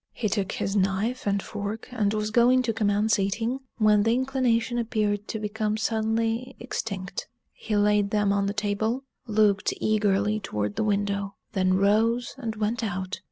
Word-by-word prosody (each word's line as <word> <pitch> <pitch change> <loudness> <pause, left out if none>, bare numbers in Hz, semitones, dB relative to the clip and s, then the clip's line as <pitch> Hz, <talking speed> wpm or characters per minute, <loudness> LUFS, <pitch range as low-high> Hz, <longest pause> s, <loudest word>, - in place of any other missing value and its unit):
He 215 - -1
took 200 -2 -1
his 195 - -2
knife 200 +5 0
and 200 -1 +1
fork, 210 +1 -5
and 215 -5 +1
was 215 0 -1
going 245 +2 +4
to 230 -2 0
commence 210 0 +2
eating, 225 +6 -1 0.2
when 210 -2 +4
the 225 +3 +3
inclination 255 -2 +1
appeared 210 -3 -1
to - - -3
become 215 0 -2
suddenly 225 +3 -1
extinct. 200 -6 -4 0.3
He 215 - -3
laid 205 0 +3
them 205 -1 +2
on 200 0 +1
the 200 - -1
table, 215 +5 -1 0.2
looked 210 -2 +2
eagerly 210 0 +1
toward 105 - -3
the - - 0
window, 200 -1 -1 0.2
then 185 -1 +2
rose 225 +5 +2
and 225 -4 -3
went 220 +3 -1
out. 190 -2 -3
210 Hz, 160 wpm, -26 LUFS, 200-225 Hz, 0.3 s, going